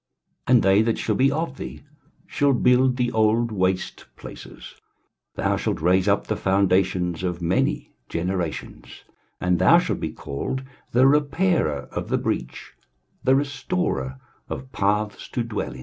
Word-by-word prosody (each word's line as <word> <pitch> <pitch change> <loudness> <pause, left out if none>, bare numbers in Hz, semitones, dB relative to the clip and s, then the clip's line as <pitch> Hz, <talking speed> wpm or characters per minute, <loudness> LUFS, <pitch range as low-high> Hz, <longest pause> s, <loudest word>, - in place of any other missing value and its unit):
23:058:012 125 - +4
And 120 - +4
they 95 +2 +5
that 115 0 +1
shall 110 - -1
be 135 +5 +3
of 155 -2 -3
thee - - -8 0.4
shall 145 -1 +1
build 125 +1 +3
the 120 -1 0
old 110 +1 +2
waste 95 -2 -1
places: - - -11 0.6
thou - - 0
shalt - - -2
raise 90 +4 +2
up 100 0 +2
the 110 - -2
foundations 95 -3 +1
of 90 -2 -2
many 85 +2 0 0.2
generations; 90 -1 -4 0.4
and 90 -1 +1
thou 95 - +6
shalt - - -1
be - - -2
called, 130 - -5 0.3
The 125 +2 +4
repairer 145 - +2
of - - -5
the - - +2
breach, 65 0 -4 0.5
The 130 - +4
restorer 135 - -2 0.3
of 130 0 -6
paths 105 +1 -1
to 120 - -2
dwell 115 -3 -4
in. 65 - -11
105 Hz, 150 wpm, -23 LUFS, 90-130 Hz, 0.6 s, thou